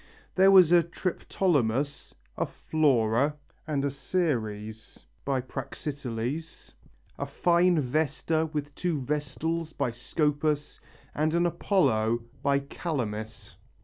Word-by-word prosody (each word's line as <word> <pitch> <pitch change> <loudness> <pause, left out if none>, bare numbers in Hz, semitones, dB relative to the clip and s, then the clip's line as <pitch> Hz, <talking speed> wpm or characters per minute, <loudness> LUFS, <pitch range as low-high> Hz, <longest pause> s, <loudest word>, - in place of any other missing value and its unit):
There 190 +1 +6
was 185 -4 +7
a 175 -1 +7
Triptolemus, 145 -6 -1 0.2
a - - -1
Flora 140 -2 +2 0.3
and 145 -2 0
a 140 - 0
Ceres 110 - -3 0.2
by 135 -2 +1
Praxiteles, 135 +2 -5 0.5
a - - -2
fine 175 -1 +3
Vesta 155 +3 0
with 145 -1 -4
two 170 -2 -1
Vestals 150 +4 -2
by 135 -4 -1
Scopas 150 +4 -1 0.3
and 155 +2 +1
an 170 0 +3
Apollo 120 - +1 0.2
by 140 0 +2
Calamis. 110 - -4
145 Hz, 105 wpm, -28 LUFS, 125-165 Hz, 0.5 s, was